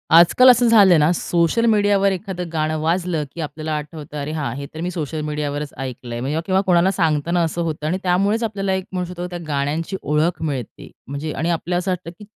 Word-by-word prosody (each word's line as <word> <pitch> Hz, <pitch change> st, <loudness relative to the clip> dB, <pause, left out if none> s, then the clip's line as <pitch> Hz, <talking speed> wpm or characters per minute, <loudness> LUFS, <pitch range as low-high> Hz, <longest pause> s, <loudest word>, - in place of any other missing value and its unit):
आजकाल, 175 Hz, +10 st, +7 dB
असं 245 Hz, 0 st, +5 dB
झालंय 200 Hz, -7 st, +7 dB
ना, 150 Hz, +2 st, +4 dB
सोशल 175 Hz, +7 st, +1 dB
मीडियावर 205 Hz, -3 st, +3 dB
एखादं 180 Hz, -2 st, -4 dB
गाणं 155 Hz, -1 st, -1 dB
वाजलं, 170 Hz, -1 st, 0 dB
की 170 Hz, -, -6 dB
आपल्याला 155 Hz, 0 st, -4 dB
आठवतं, 150 Hz, 0 st, -8 dB
अरे 145 Hz, +2 st, -4 dB
हां, 155 Hz, -2 st, -2 dB
हे 140 Hz, +1 st, -5 dB
तर 160 Hz, -, -6 dB
मी 180 Hz, +1 st, -2 dB
सोशल 155 Hz, -3 st, -4 dB
मीडियावरच 150 Hz, -1 st, -3 dB
ऐकलंय 125 Hz, -2 st, -6 dB
म्हणजे 145 Hz, +5 st, -1 dB
किंवा 190 Hz, 0 st, +2 dB
कोणाला 180 Hz, +1 st, +4 dB
सांगताना 165 Hz, -1 st, +1 dB
असं 165 Hz, +1 st, -2 dB
होतं 155 Hz, -2 st, -3 dB
आणि 180 Hz, +4 st, 0 dB
त्यामुळेच 200 Hz, +5 st, +1 dB
आपल्याला, 200 Hz, -3 st, -1 dB
एक 190 Hz, -1 st, -2 dB
म्हणू 180 Hz, -1 st, -2 dB
शकतो, 180 Hz, 0 st, -5 dB
त्या 175 Hz, -1 st, -6 dB
गाण्यांची 150 Hz, +6 st, -2 dB
ओळख 155 Hz, +4 st, 0 dB
मिळते, 140 Hz, -7 st, -5 dB, 0.2 s
म्हणजे 140 Hz, +3 st, -4 dB
आणि 165 Hz, -, -2 dB
आपल्याला 175 Hz, +1 st, -1 dB
असं 185 Hz, +1 st, -2 dB
वाटतं 180 Hz, -2 st, -4 dB
की 210 Hz, -, -10 dB
170 Hz, 205 wpm, -21 LUFS, 150-185 Hz, 0.2 s, आजकाल